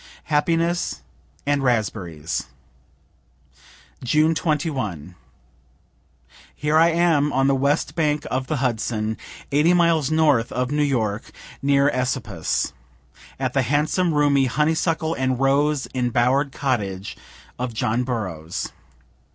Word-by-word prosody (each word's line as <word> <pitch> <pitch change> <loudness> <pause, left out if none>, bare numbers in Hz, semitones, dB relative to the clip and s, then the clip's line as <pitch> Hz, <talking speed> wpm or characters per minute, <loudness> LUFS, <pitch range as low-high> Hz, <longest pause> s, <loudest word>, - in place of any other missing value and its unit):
HAPPINESS 165 +3 +1 0.4
AND 145 0 +1
RASPBERRIES 100 - -1 1.6
June 155 +6 +3
21. 135 - -2 1.4
Here 150 +1 0
I 165 +1 +6
am, 165 -4 +2
on 135 0 +2
the 140 - +3
west 140 +2 +1
bank 150 -3 0
of 130 +1 -1
the 155 - -1
Hudson, 110 -4 -1 0.4
80 155 +5 +4
miles 170 -4 +3
north 150 -7 +2
of 125 +1 -2
New 150 0 +1
York, 115 -7 -1 0.3
near 140 0 +3
Esopus, 120 - -1 0.7
at - - -1
the - - +3
handsome, 155 +4 +1
roomy, 145 -2 +3
honeysuckle 160 +4 0
and 130 -3 -1
rose 140 +1 +2
enbower'd 125 +2 +1
cottage 100 -9 -2 0.4
of 125 0 -2
John 115 +2 0
Burroughs. 95 -10 -4
135 Hz, 110 wpm, -22 LUFS, 120-150 Hz, 1.6 s, I